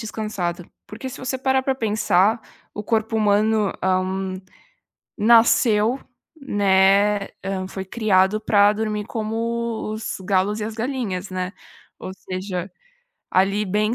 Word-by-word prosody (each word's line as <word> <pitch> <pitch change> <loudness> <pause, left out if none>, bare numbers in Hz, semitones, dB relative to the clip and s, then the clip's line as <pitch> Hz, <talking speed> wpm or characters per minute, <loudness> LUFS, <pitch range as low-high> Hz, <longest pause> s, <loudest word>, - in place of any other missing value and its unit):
descansada. 195 -6 -4 0.2
Porque 245 +5 -7
se - - -9
você 260 0 -3
parar 265 0 +1
pra 265 0 0
pensar, 215 -2 +2 0.3
o 210 - -5
corpo 220 +1 0
humano, 215 0 +2
hã, 185 0 0 0.8
nasceu, 225 +1 +4 0.4
né, 200 -3 +3 0.2
hã, 190 -1 -3
foi 190 0 -6
criado 205 -1 +2
pra 205 -1 +4
dormir 210 -1 -3
como 230 0 -3
os 220 -1 -4
galos 195 +3 0
e - - -2
as 220 0 -5
galinhas, 225 -6 -3
né, 185 +1 -3 0.5
ou 185 - -7
seja, 185 -1 -5 0.6
ali, 195 +3 +2
bem 210 +3 0
210 Hz, 125 wpm, -22 LUFS, 190-225 Hz, 0.8 s, nasceu